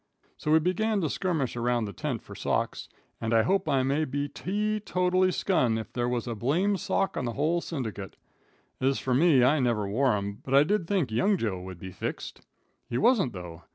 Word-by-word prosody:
So - - -5
we 160 - +7
begun 195 +6 +1
to 155 -5 -1
skirmish 160 -11 -1
around 120 -1 0
the 100 - -6
tent 145 -7 -4
for - - -11
socks, - - -2 0.3
and 115 0 0
I 110 - +5
hope 190 - +1
I 135 -2 +2
may 140 +4 +1
be 145 0 -2
tee 210 +8 -2
totally 185 -2 +1
skun 125 - +1
if 110 - -7
there 120 -1 -1
was 120 -2 -1
a 120 - -3
blame 160 - +1
sock 195 0 -1
in - - -2
the 120 - -2
whole 160 +7 +1
syndicate. 110 - -5 0.7
Ez 135 +1 +2
fur 130 - -1
me, 140 -1 +5
I 145 +5 +4
never 115 -5 +1
wore 125 +5 +2
'em, 100 0 -5
but 135 - 0
I 140 - +7
did 180 +1 0
think 180 - 0
young 190 - +2
Joe 100 - -2
would 95 -1 -8
be 95 +2 -8
fixed. - - -6 0.5
He 120 - -1
wasn't 220 - +3
though. 90 -3 -8
135 Hz, 210 wpm, -28 LUFS, 115-180 Hz, 0.7 s, we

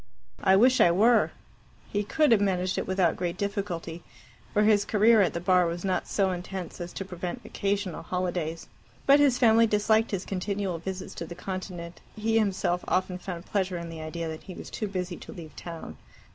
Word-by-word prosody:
"I 190 -1 +5
wish 250 +5 +5
I - - +7
were." 220 +7 +4 0.6
He 205 0 +1
could 300 +7 +2
have 220 -3 +5
managed 185 -2 0
it - - -4
without 185 -3 +2
great 175 -1 -3
difficulty, 195 -5 -3 0.5
for 210 - +3
his 210 -1 +4
career 220 +2 +5
at 185 - +1
the - - 0
Bar 180 0 +3
was 170 +2 -4
not 185 -1 0
so 195 -2 +1
intense 180 0 -6
as 175 0 -5
to 195 - -5
prevent 180 +5 -5
occasional 200 -3 -2
holidays. 175 -3 -3 0.4
But 280 +1 +7
his 280 -4 +4
family 230 -2 +5
disliked 220 +1 +2
his 195 -2 -3
continual 195 -2 -2
visits 190 +2 -6
to 165 - -4
the 175 - -8
Continent, 180 -2 -6
and 215 - -10
he 225 0 +3
himself 185 -4 0
often 185 0 0
found 180 -1 -6
pleasure 190 -3 -1
in 170 0 -6
the 160 -1 -7
idea 165 +1 -4
that 160 0 -6
he 185 - -10
was - - -9
too 215 - -3
busy 180 -2 -4
to - - -10
leave 160 -3 -10
town. 170 -2 -8
185 Hz, 200 wpm, -27 LUFS, 175-205 Hz, 0.6 s, I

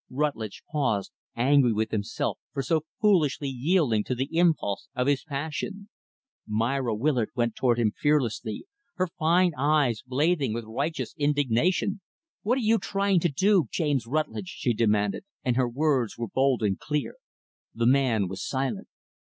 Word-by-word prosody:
Rutlidge 130 -7 -3
paused 120 -10 0 0.2
angry 130 +1 +4
with 110 +1 -1
himself 100 -2 -2
for 135 -1 -2
so 155 +3 0
foolishly 155 -9 +2
yielding 135 - +1
to 125 - -2
the 135 +6 -3
impulse 165 - +1
of 125 - 0
his 140 0 +1
passion. 160 +7 -5 0.6
Myra 115 +2 0
Willard 120 -1 +1
went 120 -2 0
toward 120 -2 +2
him 115 -3 +2
fearlessly 130 - 0 0.3
her 185 -2 +1
fine 175 +3 +4
eyes 140 -5 +2
blazing 140 -1 0
with 115 -1 -4
righteous 140 +9 -3
indignation. 145 - +1 0.4
"What 240 +5 +1
are - - -1
you 225 0 +3
trying 195 -2 +1
to 175 - +1
do, 190 +3 +3
James 145 -8 -1
Rutlidge?" 155 +6 -2
she 125 -9 -1
demanded 105 -2 +1 0.2
and 125 -2 +2
her 125 -1 +2
words 130 -3 0
were 120 0 -3
bold 130 -1 +1
and 100 -2 0
clear. 150 -2 -3 0.6
The 115 +1 0
man 125 -6 +3
was 95 +1 -6
silent. 130 -1 -2
135 Hz, 150 wpm, -26 LUFS, 115-155 Hz, 0.6 s, angry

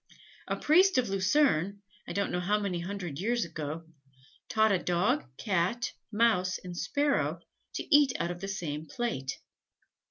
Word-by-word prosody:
A - - 0
priest 365 +4 +4
of 245 -4 +2
Lucerne, 200 - +2 0.2
I - - -4
don't 200 0 0
know 180 - 0
how 205 +4 +1
many 195 -4 -2
hundred 175 -4 -5
years 235 +3 0
ago, 160 0 -5 0.6
taught 220 -1 +3
a 190 - +3
Dog, 180 +11 +1
Cat, 200 +4 0 0.2
Mouse 210 -5 +2
and 180 -1 -8
Sparrow, 285 +11 0 0.4
to 310 - +2
eat 290 -3 +6
out 170 - -1
of 175 0 -7
the 195 - -4
same 160 -5 -4
plate. 230 - -3
195 Hz, 155 wpm, -30 LUFS, 175-235 Hz, 0.6 s, eat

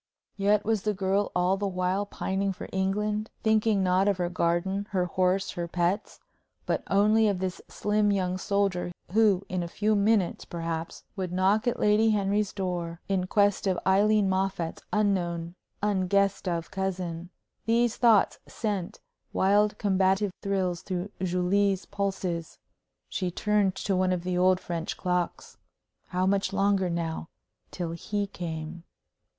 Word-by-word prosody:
Yet 205 +1 +2
was 220 -2 +1
the 210 0 -1
girl 195 +1 0
all 180 +2 +2
the 200 0 -1
while 185 +2 -1
pining 195 0 -2
for - - -8
England, 210 +3 -1
thinking 215 -2 +3
not 185 +2 +3
of 200 -2 +2
her 175 -1 -1
garden, 180 +3 0
her 185 -3 0
horse, 185 +2 +1
her 175 -1 -4
pets, 180 +4 -1 0.5
but - - 0
only 215 +2 +4
of 200 -2 +1
this 185 0 -3
slim 210 0 +1
young 185 -2 0
soldier 195 -3 0 0.2
who 205 -2 +3
in 185 -1 -2
a 170 - -3
few 210 +5 0
minutes, 205 -2 +2
perhaps, 165 -1 -5
would 185 -3 -3
knock 195 +5 +2
at 240 - 0
Lady 210 +2 +4
Henry's 205 -1 +1
door, 175 -3 -3
in 190 -2 0
quest 205 0 +2
of 185 -2 +1
Aileen 205 +2 +4
Moffatt's 190 -3 -1
unknown, 175 -5 0 0.3
unguessed 200 -1 +1
of 170 -2 -2
cousin? 180 -3 -3 0.4
These 235 0 +2
thoughts 225 -5 +4
sent 205 -5 -3 0.3
wild 205 +2 +3
combative 195 0 +2
thrills 185 -3 -1
through 185 +1 -4
Julie's 185 +2 +1
pulses. 190 -4 -3 0.5
She 185 -3 -2
turned 205 +1 +1
to 195 -1 -1
one 185 0 +2
of 180 -2 -1
the 180 0 -1
old 185 +1 +4
French 170 -2 -4
clocks. 180 -1 -2 0.5
How 185 0 0
much 195 0 +1
longer 195 -1 +2
now 165 -1 -3 0.4
till 175 -2 -4
he 205 +5 -2
came? 165 -3 -6
190 Hz, 145 wpm, -27 LUFS, 180-205 Hz, 0.5 s, only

